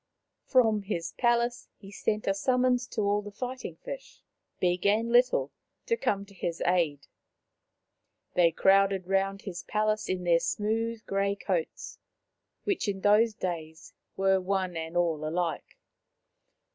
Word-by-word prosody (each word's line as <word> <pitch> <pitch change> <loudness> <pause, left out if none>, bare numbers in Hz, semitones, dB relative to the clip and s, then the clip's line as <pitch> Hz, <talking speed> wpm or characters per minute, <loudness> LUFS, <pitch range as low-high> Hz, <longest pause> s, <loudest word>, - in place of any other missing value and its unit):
From 225 -5 +4
his 170 -5 -3
palace 240 0 +1
he 195 -1 -13
sent 210 +1 -2
a 195 - +2
summons 250 +3 +1
to 220 - -3
all 205 0 0
fighting 255 +5 -6
fish, - - -9 0.4
big 180 0 +1
and 225 +3 +2
little, 245 +2 +3 0.3
to 465 - +1
come 200 - -1
to 200 - -17
his 170 -3 -4
aid. 165 -6 +1 1.3
They 170 -2 +4
crowded 195 +1 +3
round 195 +1 0
his 180 -3 -6
palace 215 0 -1
in 185 -1 -1
their 170 -1 +4
smooth 220 +4 -2
grey 200 0 0
coats, 185 -5 -3 0.6
which 400 - -1
in 195 -1 -2
those 210 +2 +4
days 160 -4 -5 0.2
were 190 0 +3
one 185 -1 -1
and 165 +1 -4
all 165 -3 +1
alike. 165 +1 -3
195 Hz, 135 wpm, -29 LUFS, 180-225 Hz, 1.3 s, From